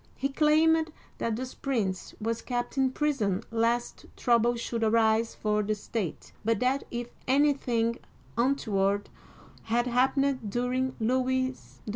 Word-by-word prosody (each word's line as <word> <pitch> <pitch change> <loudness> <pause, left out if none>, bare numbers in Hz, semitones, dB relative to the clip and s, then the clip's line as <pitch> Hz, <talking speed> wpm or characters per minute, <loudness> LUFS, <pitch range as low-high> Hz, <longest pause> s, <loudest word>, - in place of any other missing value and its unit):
He 275 - -1
claimed 315 +2 +3 0.3
that 230 -1 0
this 255 +2 -5
prince 215 -9 -2
was 230 +1 -2
kept 245 +1 -3
in 265 -1 +3
prison 245 -9 0
lest 230 +1 0
trouble 240 0 +3
should 235 -1 -3
arise 225 0 +3
for 210 0 0
the 215 +1 -1
state, 210 -3 -5
but 225 -1 +1
that 260 +2 +1
if 240 0 -5 0.2
anything 255 -4 +2 0.4
untoward 205 -6 +1 0.5
had 235 +2 +1
happened 255 -1 +1
during 250 +3 -1
Louis 255 +2 +1
XIV. 255 - -18
240 Hz, 130 wpm, -28 LUFS, 225-260 Hz, 0.5 s, claimed